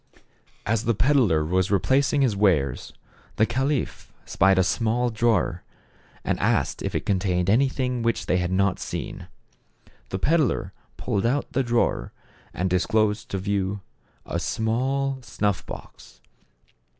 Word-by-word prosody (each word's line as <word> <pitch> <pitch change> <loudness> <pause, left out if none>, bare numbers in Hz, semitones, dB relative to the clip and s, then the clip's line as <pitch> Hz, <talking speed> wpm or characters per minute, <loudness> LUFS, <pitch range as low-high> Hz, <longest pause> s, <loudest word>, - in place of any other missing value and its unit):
As 115 +1 0
the 115 -1 +2
peddler 110 - +3
was 95 +3 +1
replacing 135 +7 +2
his 120 -6 +1
wares, 95 -9 +1 0.4
the 110 - +3
caliph 130 +4 -2
spied 95 0 +3
a 95 - +5
small 115 +5 0
drawer, 115 0 +1 0.6
and - - -1
asked - - 0
if - - -3
it - - -2
con 95 -2 +1
tained 90 -1 0
anything 125 +1 +1
which 115 0 0
they 90 - +1
had 90 0 -1
not 95 0 +1
seen. - - -6 0.8
The 95 - -2
peddler 155 - +1 0.2
pulled 100 +3 -1
out 140 +4 -1
the 135 - +2
drawer 120 - 0 0.4
and 90 - -2
disclosed 105 +4 +1
to 100 - -2
view 100 0 -2 0.4
a - - -2
small 130 +5 -1
snuff 105 -5 -1
box. - - -11
110 Hz, 140 wpm, -24 LUFS, 95-125 Hz, 0.8 s, a